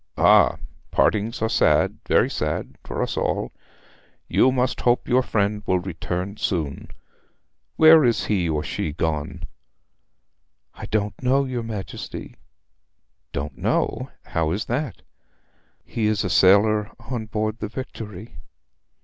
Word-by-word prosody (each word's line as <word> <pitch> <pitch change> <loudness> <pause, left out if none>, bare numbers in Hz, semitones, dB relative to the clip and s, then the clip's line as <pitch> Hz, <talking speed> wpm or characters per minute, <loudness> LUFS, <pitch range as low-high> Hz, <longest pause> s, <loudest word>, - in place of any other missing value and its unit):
'Ah - - +5 0.3
partings 110 +2 +1
are - - +3
sad - - +2
very - - +4
sad - - -3
for - - -3
us - - -3
all. - - -1 0.8
You 130 - +4
must 130 0 0
hope 120 0 +2
your 125 +1 +4
friend 105 -3 0
will 95 - +3
return 90 +2 -4
soon. 85 - -2 0.9
Where 160 -1 +8
is 120 -2 +2
he 90 -5 0
or 75 -1 -1
she 75 - -3
gone?' 80 +1 -3 1.3
'I - - -8
don't 105 -1 -2
know, 135 +2 +2
your 125 -2 -3
Majesty.' 110 -4 -7 1.0
'Don't 70 0 -5
know - - 0
how 80 -1 -1
is 95 +6 -2
that?' 130 +1 -3 0.8
'He 110 -2 -1
is 105 -1 +1
a 95 - -2
sailor 105 +3 +4 0.2
on 115 -3 -3
board 110 0 -2
the 105 - -3
Victory.' 110 -4 -8
105 Hz, 130 wpm, -23 LUFS, 90-120 Hz, 1.3 s, Where